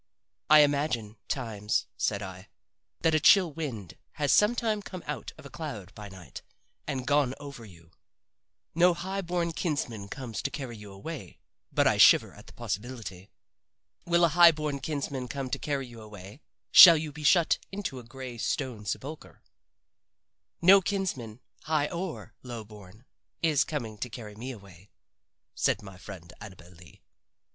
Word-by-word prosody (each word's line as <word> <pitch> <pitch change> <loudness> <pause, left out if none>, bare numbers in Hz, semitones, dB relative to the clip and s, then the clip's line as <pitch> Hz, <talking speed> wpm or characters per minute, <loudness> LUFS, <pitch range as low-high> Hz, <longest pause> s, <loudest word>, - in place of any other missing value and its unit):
I 155 0 +9
imagine, 140 -7 0
times," 110 -5 -2
said 100 0 -1
I, 95 +1 -9 0.5
"that 165 - +2
a 155 - +4
chill 180 -1 +5
wind 120 - -6
has 145 -2 0
sometime 220 0 +2
come 185 -3 -9
out 150 -1 -5
of 155 - -14
a - - -9
cloud 140 - -7
by 105 -1 -9
night 95 -3 -11 0.5
and 130 -4 -3
gone 145 -2 +2
over 140 -5 -9
you. 85 -4 -17 0.8
No 175 +1 +4
high 190 +3 -4
born 175 -2 -1
kinsman 130 - -3
comes 120 -4 -6
to - - -2
carry 135 -5 -6
you 105 -2 -11
away 135 +11 -8 0.3
but - - +2
I - - +3
shiver - - +6
at - - -15
the - - -14
possibility. 105 -4 -6 0.7
Will 170 0 +3
a - - +2
high 170 +1 +8
born 150 -3 -3
kinsman 135 -2 -4
come 135 0 -5
to - - -2
carry 140 -3 -2
you 120 -2 -12
away 105 +3 -12 0.3
shall 170 -3 +11
you 155 -1 -4
be 150 +2 -10
shut 170 +2 +4
into 195 -10 -5
a - - -11
gray 125 0 -9
stone 115 -4 -3
sepulcher?" 150 +8 -6 1.2
"No 195 +3 +8
kinsman, 150 - -3 0.2
high 155 -2 +1
or 175 -1 -6
low 120 -3 -7
born, 105 +2 -15 0.4
is 155 -3 +3
coming 115 -9 -5
to 125 - -4
carry 110 -2 -9
me 115 +5 -7
away," 100 -5 -12 0.6
said 105 - 0
my 95 -2 -11
friend 90 -3 -11
Annabel 90 -4 -12
Lee. 85 -1 -18
130 Hz, 160 wpm, -28 LUFS, 105-155 Hz, 1.2 s, shall